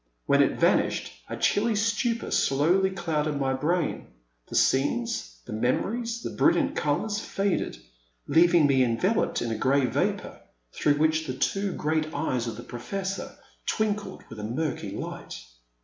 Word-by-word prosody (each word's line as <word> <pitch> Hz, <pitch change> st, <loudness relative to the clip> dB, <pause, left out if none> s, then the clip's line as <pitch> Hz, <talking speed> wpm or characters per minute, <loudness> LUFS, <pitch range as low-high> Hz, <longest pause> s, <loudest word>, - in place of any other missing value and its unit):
When -, -, +4 dB
it -, -, +1 dB
vanished, -, -, +2 dB, 0.2 s
a -, -, -4 dB
chilly 220 Hz, +2 st, +2 dB
stupor 230 Hz, +2 st, 0 dB
slowly 170 Hz, +8 st, +3 dB
clouded 155 Hz, -5 st, -1 dB
my 135 Hz, -1 st, +1 dB
brain; 160 Hz, +5 st, -1 dB, 0.4 s
the -, -, -7 dB
scenes, 230 Hz, -, +1 dB
the 115 Hz, -, -7 dB
memo 120 Hz, -, +1 dB
ries, 235 Hz, 0 st, -3 dB
the -, -, -3 dB
brilliant 300 Hz, -4 st, +2 dB
colours, 205 Hz, +9 st, 0 dB
faded, 195 Hz, -2 st, -1 dB, 0.5 s
leaving 170 Hz, -1 st, +5 dB
me 135 Hz, -2 st, +3 dB
envel 130 Hz, -, +2 dB
oped -, -, 0 dB
in 115 Hz, -, -2 dB
a -, -, -1 dB
grey 135 Hz, +3 st, +2 dB
vapour, 125 Hz, -, -2 dB, 0.3 s
through 145 Hz, -, +2 dB
which 155 Hz, +1 st, +1 dB
the 130 Hz, -, -3 dB
two 195 Hz, +8 st, 0 dB
great 155 Hz, 0 st, -1 dB
eyes 130 Hz, -5 st, -1 dB
of 115 Hz, -, -5 dB
the 120 Hz, -, -8 dB
Professor 195 Hz, +10 st, -5 dB, 0.3 s
twinkled 210 Hz, -3 st, -1 dB
with 115 Hz, -, -10 dB
a -, -, -6 dB
murky 140 Hz, +8 st, -2 dB
Ught. -, -, -6 dB
160 Hz, 155 wpm, -27 LUFS, 135-205 Hz, 0.5 s, leaving